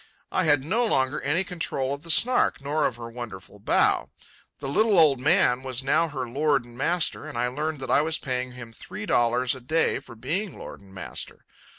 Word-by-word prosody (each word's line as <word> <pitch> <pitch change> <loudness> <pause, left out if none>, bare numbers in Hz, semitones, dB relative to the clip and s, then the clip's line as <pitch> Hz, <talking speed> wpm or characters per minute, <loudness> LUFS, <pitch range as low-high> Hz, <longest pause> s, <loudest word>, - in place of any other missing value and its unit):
I - - +2
had 145 -3 +4
no 215 - +1
longer 135 - +1
any 160 +7 +1
control 155 -7 -2
of 140 - -6
the 165 - -11
Snark, 245 +10 +4
nor 145 +2 0
of - - -5
her 115 0 -8
wonderful 115 -6 -9
bow. - - +2 0.5
The 140 - -6
little 210 +8 +3
old 150 -6 +6
man 130 -3 +3
was 130 -1 -3
now 165 +5 +2
her 135 -5 -4
lord 140 +1 +1
and 120 0 -14
master, 165 +6 0
and - - -7
I 120 - +1
learned 150 +3 -3
that 130 - -4
I - - +5
was 160 +1 0
paying 125 -1 -3
him 120 -2 -10
three 105 -2 -8
dollars 120 +1 +2
a 130 - -9
day 155 +7 +1
for 120 - -13
being 170 - -3
lord - - -9
and 100 -1 -18
master. 95 -4 -7
135 Hz, 210 wpm, -25 LUFS, 125-160 Hz, 0.5 s, old